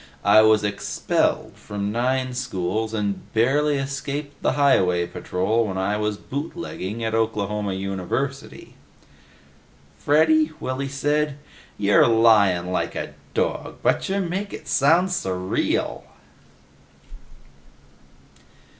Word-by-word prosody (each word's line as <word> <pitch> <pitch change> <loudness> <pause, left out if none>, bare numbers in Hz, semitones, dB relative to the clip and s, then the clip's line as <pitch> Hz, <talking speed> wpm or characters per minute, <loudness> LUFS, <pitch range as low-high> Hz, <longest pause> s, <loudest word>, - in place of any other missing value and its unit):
I 100 +2 +7
was 110 -1 +4
expelled 105 -1 -1
from 100 0 -5
nine 130 +2 0
schools 110 -1 -2
and 105 -3 -3
barely 145 +6 +2
escaped 140 +1 -5
the - - +1
highway 90 -12 +3
patrol 105 +6 -1
when 95 -2 -4
I 95 +2 0
was 105 -1 -1
bootlegging 135 - -5
at 110 0 -2
Oklahoma 105 -2 -1
University!" 95 +9 -4 1.3
"Freddy," 155 +1 +3
Willy 135 +1 -3
said, 145 +1 0 0.4
"you're 100 +2 +4
lyin' 105 -6 +4
like 90 - -2
a - - -5 0.2
dog, - - -2
butcha 195 +1 +1
make 195 +2 -3
it - - -9
sound 165 +7 +3
s' 180 - -2
real!" 90 0 -1
115 Hz, 105 wpm, -23 LUFS, 100-140 Hz, 1.3 s, I